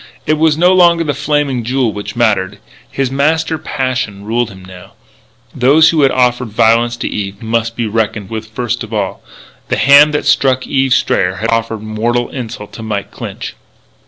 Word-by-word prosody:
It 155 0 +1
was 160 -1 +3
no 180 +3 +4
longer 170 -2 +4
the 150 -2 -1
Flaming 145 -3 -1
Jewel 125 -1 0
which 105 0 -7
mattered. 105 -4 +1 0.3
His 135 -2 -2
master 160 +3 0
passion 125 -9 -3
ruled 115 +2 -1
him 95 -2 -13
now. 90 -1 -13 0.6
Those 145 +6 +5
who 160 -2 +1
had 135 - +5
offered 125 -1 +1
violence 115 +2 +2
to - - -3
Eve 100 +1 -5
must 115 0 -1
be 120 - -2
reckoned 105 -2 -2
with 110 -1 -5
first 120 +2 -3
of 110 0 -6
all. 100 -3 -3 0.5
The - - -1
hand 140 +2 +6
that - - -1
struck 130 -1 +2
Eve 135 -2 +1
Strayer 95 0 +1
had 110 +4 -2
offered 115 -1 -1
mortal 115 +3 -1
insult 115 -5 -7
to - - -9
Mike 105 -3 -4
Clinch. - - -7
120 Hz, 180 wpm, -14 LUFS, 110-135 Hz, 0.6 s, hand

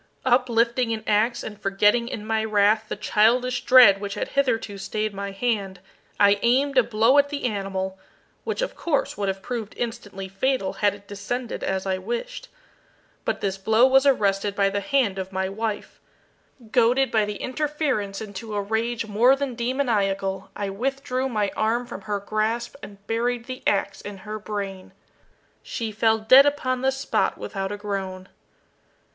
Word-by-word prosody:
Uplifting 240 -1 +2
an 220 -1 -5
ax, 220 +3 +1
and 210 -1 -8
forgetting 205 +4 +2
in 210 -3 -6
my 220 0 0
wrath 215 0 +3
the - - -2
childish 240 +4 +2
dread 225 -7 +7
which 200 -1 -4
had - - -3
hitherto 230 -7 0
stayed 215 +2 -3
my 200 0 -4
hand, 195 -3 -2 0.4
I 200 0 +5
aimed 270 +4 +2
a - - +7
blow 230 +4 +3
at 285 0 +2
the 290 -1 -5
animal, 190 -3 -3 0.4
which - - -2
of - - -4
course 310 -5 -1
would 200 -1 -2
have 195 0 -3
proved 230 -4 -5
instantly 215 -5 -5
fatal 195 +1 -1
had 205 -1 +3
it 200 0 -17
descended 225 +5 -4
as 190 0 -2
I 190 -1 -1
wished. 240 - -5 0.8
But - - -2
this 195 -1 -2
blow 220 +5 +4
was 265 +1 +4
arrested 200 -5 +2
by 195 0 +2
the 200 - -1
hand 245 -6 0
of 190 0 -5
my 190 0 -1
wife. 215 +1 -4 0.7
Goaded 250 +1 +3
by 215 -2 +2
the 210 0 -4
interference 260 -7 -2
into 210 +1 -7
a - - 0
rage 225 +3 -1
more 225 +5 +4
than 275 -2 -3
demoniacal, 205 -6 -1
I 200 -1 -3
withdrew 260 +3 -2
my 210 -4 0
arm 230 +3 0
from 205 - -8
her 205 0 -3
grasp 215 +4 -2
and 200 0 -12
buried 235 +2 -1
the 255 0 -7
ax 200 -1 0
in 205 -1 -8
her 215 0 -5
brain. 200 -3 -6 0.7
She 225 -3 -4
fell 220 +1 +2
dead 255 +6 +7
upon 255 -3 -1
the 265 0 +2
spot 270 +1 -1
without 195 -1 -4
a 205 - -4
groan. 195 -2 -5
215 Hz, 170 wpm, -24 LUFS, 200-245 Hz, 0.8 s, dread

